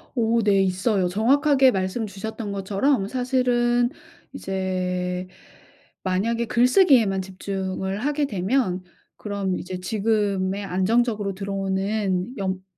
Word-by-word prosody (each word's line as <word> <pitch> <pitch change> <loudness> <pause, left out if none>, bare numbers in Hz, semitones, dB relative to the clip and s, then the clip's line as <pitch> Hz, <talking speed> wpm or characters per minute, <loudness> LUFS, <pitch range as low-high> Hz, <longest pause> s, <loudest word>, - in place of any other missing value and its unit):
오 230 -1 +2
네 200 -2 +4
있어요. 185 +1 +1
정확하게 265 - +4
말씀 190 +3 -2
주셨던 205 +2 -6
것처럼 200 +4 0
사실은 245 -1 +1 0.4
이제 185 -1 -2 0.8
만약에 225 +6 0
글쓰기에만 240 - +4
집중을 190 0 -4
하게 290 +4 0
되면 190 -3 0 0.3
그럼 200 -3 -3
이제 185 0 -6
지금의 200 -1 0
안정적으로 205 +2 +1
들어오는 195 +2 -2
연 190 -2 -3
200 Hz, 255 characters per minute, -24 LUFS, 190-235 Hz, 0.8 s, 네